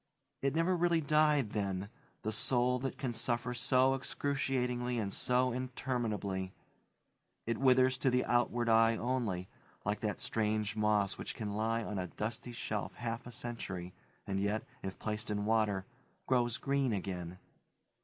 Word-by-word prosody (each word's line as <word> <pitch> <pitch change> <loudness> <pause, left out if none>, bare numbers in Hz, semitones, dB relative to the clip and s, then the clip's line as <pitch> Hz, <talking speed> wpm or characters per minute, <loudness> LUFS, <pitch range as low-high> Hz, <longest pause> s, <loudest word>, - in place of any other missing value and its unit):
It 135 +1 +1
never 170 +3 +3
really 170 -1 +3
died, 150 -5 +3
then 100 -2 -1 0.4
the 110 - -1
soul 125 +3 +2
that 135 +1 -3
can 130 -4 -2
suffer 120 +1 0
so 130 +2 +4
excruciatingly 130 -3 -1
and 100 -3 -1
so 125 0 +2
interminably; 115 -7 -2 0.9
it 115 -1 -1
withers 130 -1 +5
to 135 - +3
the 125 0 +2
outward 120 -1 +2
eye 115 0 +5
only; 115 -8 -1 0.4
like 105 +1 0
that 105 -2 -1
strange 110 -1 0
moss 105 -2 +2
which - - -5
can 105 -3 -3
lie 115 +2 0
on 105 -2 -3
a 90 - -2
dusty 115 +6 -4
shelf 110 -3 -3
half 115 0 -4
a - - -7
century 95 -7 -5 0.3
and 95 -1 -1
yet, 105 +2 0 0.2
if 95 0 -5
placed 105 0 -3
in 105 0 -1
water, 105 -3 +2 0.4
grows 120 -1 +2
green 140 -3 +1
again. 90 -3 -4
115 Hz, 150 wpm, -34 LUFS, 105-130 Hz, 0.9 s, withers